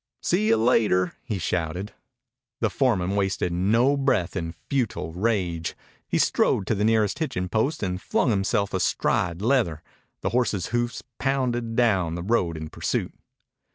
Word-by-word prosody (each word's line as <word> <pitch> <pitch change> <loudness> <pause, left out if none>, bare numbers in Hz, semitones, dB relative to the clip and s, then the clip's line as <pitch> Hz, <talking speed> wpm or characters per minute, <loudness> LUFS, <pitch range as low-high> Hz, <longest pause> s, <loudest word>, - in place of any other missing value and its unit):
"See 105 - +2
you 115 0 +4
later!" 110 -6 +3
he 115 -6 -3
shouted. 90 +4 -2 0.7
The 110 -4 +1
foreman 100 -5 +1
wasted 95 -3 0
no 115 +10 +3
breath 125 -11 +1
in 80 0 -3
futile 120 -11 -1
rage. 90 -4 -1 0.3
He - - 0
strode 95 - +2
to - - +1
the 105 -1 0
nearest 110 - +2
hitching 90 - -2
post 115 - 0
and 90 -1 -2
flung 125 - +1
himself 100 0 0
astride 90 -1 0
leather. 110 - +1 0.4
The - - 0
horse's 115 -6 0
hoofs 120 0 -1 0.2
pounded 125 -4 0
down 95 -9 +2
the 85 - -4
road 90 -6 +1
in 80 0 -6
pursuit. - - -2
105 Hz, 150 wpm, -25 LUFS, 90-120 Hz, 0.7 s, you